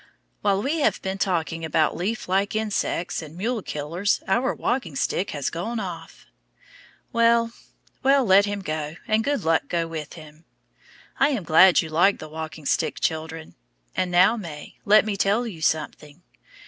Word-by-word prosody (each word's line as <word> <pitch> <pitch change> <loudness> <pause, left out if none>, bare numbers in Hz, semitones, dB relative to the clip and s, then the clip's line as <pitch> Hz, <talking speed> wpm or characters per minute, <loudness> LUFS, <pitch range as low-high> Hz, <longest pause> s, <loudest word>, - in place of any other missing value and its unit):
While 200 -1 +1
we 310 +4 0
have 290 - +2
been 190 0 -3
talking 165 -4 -1
about 160 -1 +1
leaf 200 +7 -3
like 195 +3 0
insects 210 -6 -1
and 160 +1 -11
mule 225 +4 -1
killers 170 +6 -1
our 240 +7 +2
walking 235 - -2
stick 185 +7 -1
has 145 -3 -3
gone 220 +8 -3
off. 180 -5 -8 0.9
Well, 230 0 +3 0.5
well, 275 -1 +4
let 195 0 +6
him 205 -1 -3
go, 155 -1 -4
and 220 +1 +2
good 285 -4 -1
luck 160 0 +1
go 170 -1 -1
with 155 -3 -6
him. 155 0 -14 0.7
I 275 - +5
am 255 -10 -2
glad 175 +3 +6
you 160 - -7
like 175 +6 +3
the 155 - -9
walking 160 -1 -7
stick, - - 0
children. 160 0 -3 0.4
And 185 - 0
now, 180 +6 +5
May, 165 -9 -8
let 210 +1 +6
me 215 -2 -2
tell 205 +5 +1
you 185 -9 -7
something. 155 +1 -2
185 Hz, 165 wpm, -24 LUFS, 160-215 Hz, 0.9 s, let